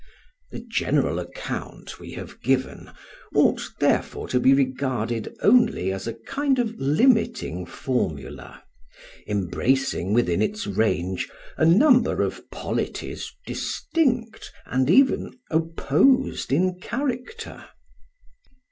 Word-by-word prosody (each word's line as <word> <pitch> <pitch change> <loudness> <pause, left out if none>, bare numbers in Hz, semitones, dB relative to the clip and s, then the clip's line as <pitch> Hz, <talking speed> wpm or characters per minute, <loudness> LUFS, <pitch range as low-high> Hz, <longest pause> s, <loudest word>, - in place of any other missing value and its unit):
The 235 - -8
general 140 - 0
account 90 - -7
we - - -10
have - - -9
given 130 +1 -1 0.5
ought - - +4 0.2
therefore - - 0
to 125 - +2
be 130 - +5
regarded 130 -4 0
only 200 - +4
as 95 +3 -5
a 115 - -4
kind 275 -1 0
of 235 -3 0
limiting 215 - +2
formula, 80 - -4 0.6
embracing 105 +2 0
within 110 -7 +2
its 215 +1 -1
range 95 -3 -1 0.3
a 160 - +2
number 245 - +5
of - - -5
polities - - -4
distinct 250 -8 -1
and 130 +1 0
even 260 +5 +3
opposed 165 - +2
in 180 +5 +1
character. 260 - -4
140 Hz, 105 wpm, -24 LUFS, -, 0.6 s, be